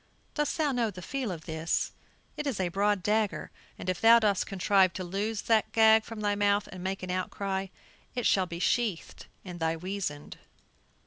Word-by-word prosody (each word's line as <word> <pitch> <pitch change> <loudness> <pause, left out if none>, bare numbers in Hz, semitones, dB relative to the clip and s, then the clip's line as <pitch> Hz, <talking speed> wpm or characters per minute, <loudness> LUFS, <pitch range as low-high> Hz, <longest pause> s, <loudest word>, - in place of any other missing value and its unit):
"Dost 295 -2 -1
thou 305 -3 +1
know 240 -3 0
the 180 -3 -9
feel 260 0 -3
of 160 -3 -7
this? 160 +1 -1 0.4
It 300 - -4
is 255 -8 -2
a 185 -2 0
broad 200 +1 +1
dagger, 215 0 0 0.3
and - - -8
if 185 -1 -1
thou 230 +1 +8
dost 205 -4 +1
contrive 190 -1 +3
to 185 - -4
loose 205 +4 -2
that 225 -2 +2
gag 220 0 +6
from 225 -2 -7
thy 205 -1 +1
mouth 205 0 +2
and 185 -1 -8
makest 190 0 -3
any 180 0 -3
outcry, 190 +1 -2 0.5
it 245 -2 -2
shall 190 -2 +3
be 170 -1 -6
sheathed 205 0 -1 0.2
in 180 -2 -8
thy 165 0 0
weasand." 180 -4 -5
200 Hz, 190 wpm, -29 LUFS, 180-220 Hz, 0.5 s, thou